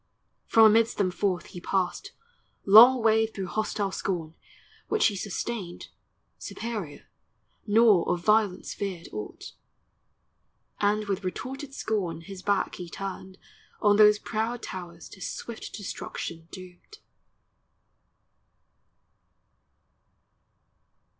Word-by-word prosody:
From 225 -1 +6
amidst 225 +1 +4
them 190 -3 +1
forth 185 -1 -1
he 175 - -10
passed, 195 - -2 0.5
Long 230 +5 +8
way 220 0 +4
through 195 -3 -6
hostile 205 0 -2
scorn, 170 -5 -3 0.5
which 435 - +2
he 205 - +2
sustained 200 -1 -5 0.5
Superior, 215 -10 -6 0.6
nor 210 -4 +4
of 175 - -1
violence 210 -3 +2
feared 190 -4 -5
aught; 105 0 -7 1.3
And 210 +1 +1
with 200 0 -2
retorted 270 +9 -6
scorn 180 - -2
his 190 +2 -10
back 200 0 0
he 180 -2 -7
turned 190 0 -7 0.4
On 205 -1 +4
those 210 0 +7
proud 225 +2 -3
towers 175 -2 -8
to 190 - -14
swift 230 +5 -6
destruction 170 -5 -6
doomed. 185 - -12
200 Hz, 100 wpm, -27 LUFS, 185-220 Hz, 1.3 s, Long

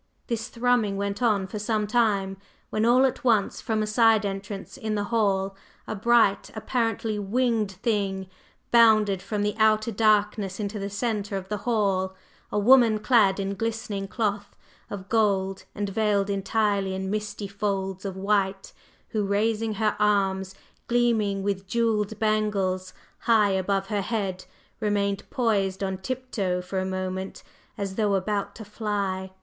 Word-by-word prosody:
This 225 -2 -3
thrumming 235 -4 +1
went 200 +2 -3
on 210 -5 +2
for 200 +3 -6
some 215 0 0
time 205 -4 +1 0.3
when 215 +1 +1
all 250 +3 +5
at 260 - -1
once 225 -5 +2
from 220 -1 0
a - - 0
side 220 0 +4
entrance 195 0 -5
in 220 -5 -3
the 205 - 0
hall 195 -3 +1 0.3
a - - -4
bright, 220 -1 +3
apparently 225 -1 -1
winged 220 0 0
thing 195 -2 -1 0.4
bounded 215 -5 +5
from 210 0 -2
the 210 0 0
outer 215 +1 +3
darkness 210 -2 +1
into 210 0 -3
the 200 0 -3
centre 205 -1 -2
of 190 0 -7
the 210 - -1
hall, 195 -4 +1 0.4
a - - -1
woman 230 0 +6
clad 210 -3 +3
in 195 0 -2
glistening 220 -1 -3
cloth 205 -1 -2 0.3
of 195 -1 -7
gold 195 -4 +1
and 205 -1 -2
veiled 205 -1 +1
entirely 200 -1 0
in 190 0 -3
misty 210 -1 -3
folds 195 -2 -3
of 195 -2 -5
white, 195 -1 0 0.4
who, 215 -2 -1
raising 215 +2 0
her 215 0 +1
arms 195 -2 +1 0.3
gleaming 225 -5 +1
with 195 -1 -2
jewelled 220 -1 0
bangles 205 -4 0 0.3
high 220 -4 +3
above 195 +1 0
her 205 -2 0
head, 195 -3 -3 0.3
remained 200 -2 -1
poised 200 -5 0
on 190 -1 -2
tiptoe 220 -6 -2
for 180 +1 -3
a 185 - -1
moment, 185 0 -4 0.3
as 195 -2 -4
though 210 -3 +2
about 200 +1 -2
to 220 - -9
fly. 200 -3 -3
205 Hz, 150 wpm, -26 LUFS, 195-220 Hz, 0.4 s, woman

